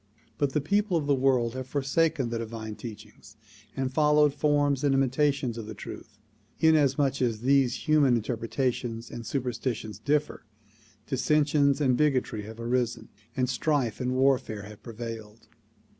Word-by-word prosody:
But 140 -2 0
the 150 - +1
people 200 +3 +1
of 150 - -2
the 145 - +3
world 130 -3 +2
have 130 0 -5
forsaken 140 0 0
the 115 0 -3
divine 110 -1 -6
teachings 105 -2 -11 0.4
and 130 -1 -2
followed 150 -1 +4
forms 145 -2 +1
and 140 -2 +3
imitations 135 -2 +1
of 110 - -7
the 110 - -7
truth. 105 - -10 0.4
Inasmuch 145 -4 +3
as 115 -4 0
these 135 -1 +2
human 145 -5 +4
interpretations 115 0 -2
and 120 - -7
superstitions 120 -5 -3
differ, 150 +5 -1 0.6
dissensions 145 +1 +2
and 130 -4 +3
bigotry 130 -6 +1
have 110 +1 -10
arisen 120 0 -1 0.3
and 125 -1 +1
strife 130 -2 0
and 125 0 -1
warfare 130 -6 +1
have 105 +1 -12
prevailed. 115 -2 -8
130 Hz, 145 wpm, -27 LUFS, 115-145 Hz, 0.6 s, followed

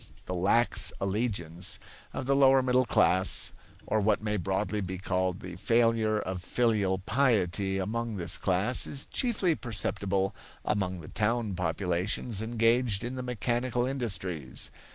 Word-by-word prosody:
The 90 - -4
lax 100 +7 +2
allegiance 95 -3 -1 0.3
of - - -5
the 140 +1 +2
lower 135 -1 +5
middle 125 0 +2
class, 95 -2 +4 0.3
or 110 0 +1
what 105 0 +2
may 105 0 -2
broadly 105 +2 -1
be 95 -1 -4
called 95 0 -1
the 90 -1 -7
failure 115 +1 +2
of 95 -3 -4
filial 105 -2 +1
piety 100 -4 +1
among 110 +4 -2
this 85 -2 0
class, 95 +7 +2
is 140 - -1
chiefly 210 -9 +1
perceptible 100 -5 -1 0.3
among 95 -3 -1
the 75 - -11
town 110 +1 -1
populations 90 +5 -1
engaged 115 -1 +1
in 120 +2 -4
the 130 - -4
mechanical 125 0 -1
industries. 95 - -3
105 Hz, 135 wpm, -29 LUFS, 95-120 Hz, 0.3 s, lower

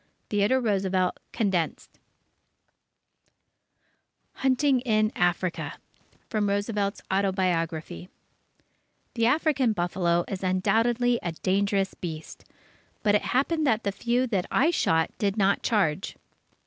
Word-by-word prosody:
Theodore 210 +5 +2
Roosevelt 190 -5 0
(Condensed) 190 -7 -2 2.4
HUNTING 265 0 +2
IN 215 -3 +1
AFRICA 175 0 0 0.5
From 210 -2 0
Roosevelt's 205 0 -1
Autobiography 170 - -1 1.0
The 230 -1 +2
African 275 -4 +2
buffalo 175 -2 0
is 190 - -5
undoubtedly 225 +6 +1
a 170 - -3
dangerous 195 +2 0
beast, 160 -3 -8 0.6
but 205 - +3
it 210 - +3
happened 300 +4 +1
that 225 -2 +2
the 200 - 0
few 240 +5 0
that 200 -7 -1
I 315 +5 +3
shot 165 - +1
did 200 0 0
not 200 -1 +2
charge. 190 -5 0
200 Hz, 105 wpm, -26 LUFS, 185-235 Hz, 2.4 s, but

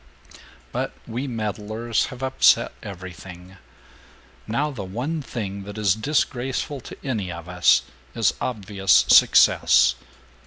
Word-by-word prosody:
But - - -3
we 125 +5 -4
meddlers 110 0 -2
have 125 +1 -9
upset 130 0 +3
everything. 90 0 -10 0.9
Now 140 +7 -1
the 125 -8 -6
one 125 - -4
thing 100 -7 -5
that 105 +1 -9
is 105 -4 +2
disgraceful 135 +2 -2
to - - -11
any 110 -9 -3
of 85 0 -9
us 90 0 +3 0.3
is - - +2
obvious 100 -5 +2
success. 60 -1 +5
110 Hz, 115 wpm, -23 LUFS, 95-125 Hz, 0.9 s, success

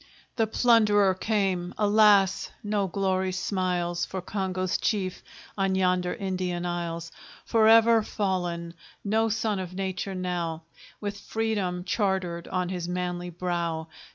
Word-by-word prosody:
The 225 -2 +2
plunderer 210 -4 +4
came; 185 -3 -1
alas! 205 -2 +4
no 205 -2 0
glory 190 0 0
smiles 180 -2 -1
For 190 - -4
Congo's 185 -1 -2
chief, 190 -4 -1 0.3
on 195 -1 +1
yonder 180 -1 +1
Indian 185 -2 -2
isles; 170 -1 -3 0.3
Forever 225 0 +6
fallen! 175 -5 -2 0.3
no 220 +2 +2
son 215 -2 0
of 185 -1 -6
nature 190 0 -3
now, 175 -3 -3 0.4
With 205 -1 -4
Freedom 205 -5 -2
chartered 190 -5 -1
on 180 -1 -1
his 175 -2 -4
manly 180 0 -3
brow. 170 -2 -3
185 Hz, 120 wpm, -27 LUFS, 180-205 Hz, 0.4 s, Forever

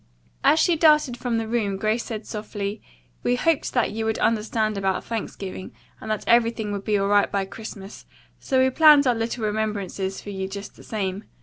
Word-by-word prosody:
As 315 - +5
she 345 +1 +3
darted 300 -5 +4
from 240 -1 -2
the 225 -1 -2
room, 215 -4 -1
Grace 215 +4 0
said 220 -2 -6
softly: 210 -1 -5 0.4
"We 245 - +1
hoped 320 +4 +1
that 245 - +2
you 225 +1 -3
would 220 0 0
understand 215 -1 0
about 195 -1 -1
Thanksgiving 195 -4 -6 0.3
and 220 - -8
that 215 -1 -1
everything 230 -2 +2
would 200 -1 -4
be 210 -1 +1
all 195 0 0
right 205 0 +3
by 195 -1 0
Christmas, 200 0 -10 0.3
so 260 - 0
we 260 0 +4
planned 300 0 +7
our 250 - +4
little 225 0 -2
remembrances 205 -3 -2
for 205 - -8
you 190 -1 -3
just 200 +1 -8
the - - -15
same. 200 -1 -3
215 Hz, 195 wpm, -24 LUFS, 200-235 Hz, 0.4 s, planned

